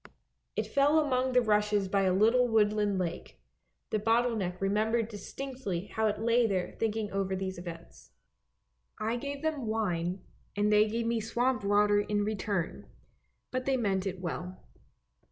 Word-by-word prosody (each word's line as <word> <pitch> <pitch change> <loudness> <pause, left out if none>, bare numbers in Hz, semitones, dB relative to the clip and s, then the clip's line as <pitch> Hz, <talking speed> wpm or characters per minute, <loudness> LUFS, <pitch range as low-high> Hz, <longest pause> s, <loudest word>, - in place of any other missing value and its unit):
It - - 0
fell 285 +3 +3
among 260 -4 +1
the 250 -1 +4
rushes 210 -2 +2
by 195 +1 +1
a 185 - +3
little 225 +6 +4
woodland 210 -3 +2
lake. 175 -2 -4 0.5
The 215 - +1
bottle 230 +3 +2
neck 180 -4 -3
remembered 215 +3 +1
distinctly 210 -3 -5
how 220 -1 +1
it 210 - 0
lay 230 +1 +3
there 185 -4 -1
thinking 220 -1 -1
over 195 -1 -1
these 190 -1 -4
events. 170 -1 -10 0.4
" - - -50 0.3
I 220 +2 -1
gave 280 +4 -5
them 300 -7 -1
wine, 185 -4 -1 0.3
and 210 +1 +2
they 210 +1 +5
gave 230 +2 -2
me 230 0 +1
swamp 240 +2 0
water 205 +1 +4
in 205 0 0
return, 200 -4 -2 0.6
but 255 0 -2
they 270 -1 +2
meant 195 -4 0
it 190 -1 -4
well." 180 +1 -5
210 Hz, 160 wpm, -30 LUFS, 195-235 Hz, 0.6 s, they